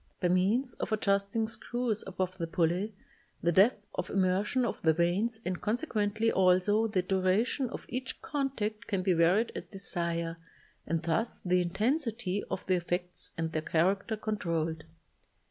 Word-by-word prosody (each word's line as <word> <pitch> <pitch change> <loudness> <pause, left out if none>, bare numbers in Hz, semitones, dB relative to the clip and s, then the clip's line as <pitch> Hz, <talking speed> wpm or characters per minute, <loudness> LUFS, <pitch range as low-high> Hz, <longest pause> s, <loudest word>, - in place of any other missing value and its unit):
By 180 - +1
means 210 +8 +2
of - - -3
adjust 200 -1 +1
ing 225 -1 +2
screws 235 -1 -2
above 185 0 -3
the 165 - -1
pulley, 180 +5 0 0.5
the 170 - +3
depth 205 +4 +4
of 180 +1 -3
immersion 195 +6 +2
of 235 - -3
the 160 -1 +4
vanes 185 +8 +1
and 180 -1 -2
consequently, 220 -2 0
also, 190 +4 +4
the 190 -4 0
duration 195 +8 +1
of - - -7
each 255 +2 -4
contact 230 -6 -2
can 195 -3 -1
be 185 -1 +3
varied 175 +7 +3
at - - -6
desire 170 -4 -2 0.5
and 165 +1 -1
thus 170 +8 0
the 180 0 +3
intensity 215 - 0
of - - -4
the 185 -1 +2
effects 175 +1 -3
and 165 -1 -1
their 155 - -1
character 195 +7 +1
controlled. 165 -7 -2
195 Hz, 155 wpm, -30 LUFS, 175-220 Hz, 0.5 s, depth